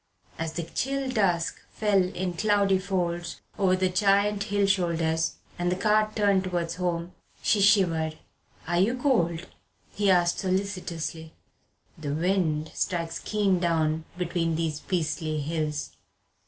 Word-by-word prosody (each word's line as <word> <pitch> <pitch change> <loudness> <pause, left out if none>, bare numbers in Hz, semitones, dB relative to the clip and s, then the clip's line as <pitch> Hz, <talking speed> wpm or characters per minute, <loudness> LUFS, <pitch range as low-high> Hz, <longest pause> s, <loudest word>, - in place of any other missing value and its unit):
As 165 -1 -3
the 170 - -3
chill 270 +9 -2
dusk 180 -8 +1
fell 210 -3 +2
in 180 0 -2
cloudy 200 0 +2
folds 175 -3 -2 0.2
over 185 -2 +4
the 185 0 +1
giant 200 +2 +2
hill 205 -1 +1
shoulders 165 -4 +1 0.2
and 175 0 +1
the - - +1
cart 215 +2 +2
turned 200 -3 +3
towards 175 -2 -2
home, 175 -1 -2 0.3
she 210 - +3
shivered. 170 -6 +3 0.5
"Are 175 0 +1
you 225 +7 +2
cold?" 175 - +1 0.5
he 205 -1 +1
asked 175 -2 +3
solicitously. 185 -4 -3 0.7
"The 145 -2 -3
wind 160 -3 0
strikes 165 -2 -2
keen 200 -4 +1
down 160 -2 +1
between 170 -2 -1
these 160 -2 -1
beastly 155 -3 -2
hills." 150 0 -2
180 Hz, 130 wpm, -27 LUFS, 165-200 Hz, 0.7 s, over